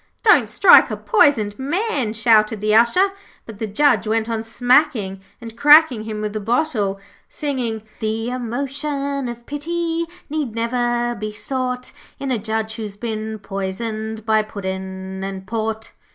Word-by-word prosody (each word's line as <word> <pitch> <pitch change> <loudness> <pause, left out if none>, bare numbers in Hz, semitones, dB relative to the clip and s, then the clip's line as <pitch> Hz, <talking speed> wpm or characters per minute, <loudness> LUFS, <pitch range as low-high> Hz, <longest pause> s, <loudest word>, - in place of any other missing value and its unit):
'Don't 425 -3 +5
strike - - +7
a - - -3
poisoned 235 - +2
man,' 290 - -1
shouted 220 -1 +3
the 215 +1 +1
Usher; 235 - +4 0.4
but 220 -3 -11
the 220 - -2
Judge 275 +2 +2
went 220 0 0
on 225 -1 -2
smacking 235 -4 +1 0.2
and 230 -2 -10
cracking 290 -5 +6
him 215 -1 -5
with 210 -1 -3
the 215 - -2
bottle, 215 -3 0 0.3
singing 245 -7 -3 0.2
'The 225 +2 -2
emotion 275 +3 -3
of 240 0 -8
pity 335 +3 -2 0.2
Need 290 -7 -3
never 240 +1 0
be 215 -1 -5
sought 250 +3 -3 0.3
In 275 -1 -4
a 240 - 0
Judge 220 +1 -3
who's 210 -3 -6
been 220 -1 -4
poisoned 215 +3 -5
By 220 -1 +3
Puddin' 190 -2 -6
and 195 -1 -5
Port.' 220 +1 -3
225 Hz, 145 wpm, -20 LUFS, 215-270 Hz, 0.4 s, strike